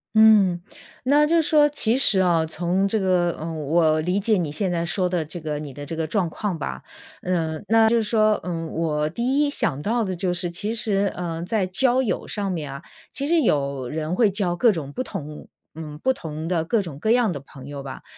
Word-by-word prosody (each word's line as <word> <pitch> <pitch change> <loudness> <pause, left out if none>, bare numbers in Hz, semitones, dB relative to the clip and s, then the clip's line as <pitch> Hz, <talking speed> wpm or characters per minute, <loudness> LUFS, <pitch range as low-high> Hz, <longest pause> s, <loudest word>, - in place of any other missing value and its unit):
嗯。 205 -5 +6 0.4
那 290 +3 +5
就 335 +1 +4
说 300 -1 +4
其 250 -5 +1
实 215 -7 +3
啊， 170 -3 +3
从 175 +4 0
这 220 +2 0
个， 180 -2 +1
嗯， 160 -1 -5
我 155 0 +3
理 180 +4 0
解 210 0 +2
你 160 -5 -2
现 185 +3 -1
在 170 -1 -1
说 180 +1 0
的 175 -3 -1
这 160 +3 -7
个 150 -1 -3
你 145 -3 -7
的 145 +1 -8
这 165 - -5
个 160 -1 -2
状 180 -1 0
况 190 0 -3
吧。 65 - -5 0.4
嗯， 165 -1 -2
那 225 0 +5
就 235 - +2
是 225 - +1
说， 215 -1 +2
嗯， 165 -2 -4
我 155 -2 -1
第 250 - 0
一 290 - +1
想 145 - -1
到 230 +4 0
的 190 -2 -3
就 180 +1 -1
是 175 0 -1
其 205 +6 -4
实， 200 -3 0
嗯， 170 -1 -4
在 205 -1 0
交 250 +7 +2
友 240 - -2
上 200 -2 -2
面 150 -5 -4
啊， 140 +4 -9 0.3
其 280 +2 -3
实 335 0 +3
有 140 - 0
人 160 +3 -3
会 220 -2 +4
交 185 -3 -1
各 230 +4 +4
种 145 -6 -5
不 - - -2
同 150 - -7 0.3
嗯， 155 -2 -7
不 260 - +3
同 160 -5 -6
的 170 -2 0
各 210 +3 +1
种 145 -5 -8
各 220 - -1
样 240 -5 +3
的 145 - -4
朋 135 -1 -13
友 145 -1 -6
吧。 130 -1 -8
180 Hz, 240 characters per minute, -23 LUFS, 160-215 Hz, 0.4 s, 嗯